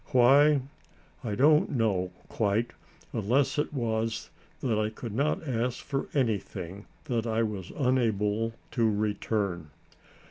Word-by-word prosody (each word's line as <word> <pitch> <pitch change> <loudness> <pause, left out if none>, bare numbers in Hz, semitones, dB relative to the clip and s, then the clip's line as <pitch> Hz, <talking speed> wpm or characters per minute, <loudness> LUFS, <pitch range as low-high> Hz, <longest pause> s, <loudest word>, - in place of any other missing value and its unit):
Why? 140 +4 +6 0.6
I 105 -4 -2
don't 150 +6 +5
know, 105 -8 +1 0.2
quite, 110 +2 0 0.4
unless 130 +6 +1
it 150 - 0
was 115 -4 -2 0.3
that 115 -4 +1
I 105 0 +1
could 110 0 -7
not 145 +5 0
ask 125 0 0
for 135 -1 -2
anything 105 - -2 0.2
that 120 -2 -1
I 115 0 +1
was 100 -5 -4
unable 115 -4 +1 0.2
to 115 -3 +2
return. 105 -5 -1
115 Hz, 120 wpm, -28 LUFS, 105-130 Hz, 0.6 s, Why